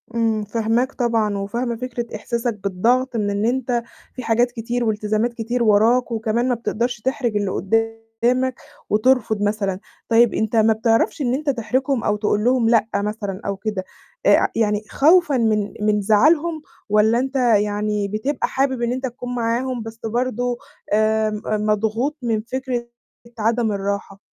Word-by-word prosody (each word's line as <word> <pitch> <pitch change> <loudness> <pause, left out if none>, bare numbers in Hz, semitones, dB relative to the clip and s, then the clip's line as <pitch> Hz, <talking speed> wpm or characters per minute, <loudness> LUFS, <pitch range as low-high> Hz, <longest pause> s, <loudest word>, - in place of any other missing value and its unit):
إمم، 225 -2 +1
فاهماك 225 +4 0
طبعًا، 225 -4 0
وفاهمة 235 +5 -2
فكرة 240 -1 -5
إحساسك 235 +2 -2
بالضغط 240 +7 +1
من 210 -2 0
إن 200 +1 -1
أنت 245 -1 0 0.3
في 255 - -6
حاجات 240 +2 +2
كتير 240 +1 -3
والتزامات 215 +1 0
كتير 235 +1 -2
وراك، 230 +4 +3
وكمان 230 +2 0
ما 245 - +2
بتقدرش 235 +1 -2
تحرِج 255 -3 -1
اللي 200 -2 -1
قدامك، 225 +5 -1 0.3
وترفض 220 -1 +2
مثلًا. 205 -2 -1 0.3
طيب 230 0 +5
أنت 220 +1 -1
ما 220 0 +5
بتعرفش 225 +6 +1
إن 245 -3 +1
أنت 290 +2 -1
تحرجهم 255 +1 0
أو 210 - +1
تقول 210 0 0
لهم 245 -1 +3
لأ 225 -2 +3
مثلًا 205 -2 -3
أو 200 -1 -2
كده، 205 -1 -3 0.4
آآ - - +5
يعني 210 -2 +1
خوفًا 315 -1 +4
من 215 -3 +1
من 210 0 +2
زعلهم 305 +10 +3 0.3
والّا 215 +3 +4
أنت 265 +2 -3
يعني 210 -4 +1
بتبقى 215 +8 -2
حابب 265 -2 0
إن 235 0 0
أنت 260 +1 -2
تكون 245 0 -6
معاهم 240 +1 -1
بس 225 0 -9
برضه 245 +1 -1 0.4
آآ 215 0 +2
م 210 0 -5 0.2
مضغوط 220 +7 0
من 225 -3 0
فِكرة 250 0 -4 0.5
عدم 225 +1 +1
الراحة؟ 200 0 -3
230 Hz, 155 wpm, -21 LUFS, 215-245 Hz, 0.5 s, طيب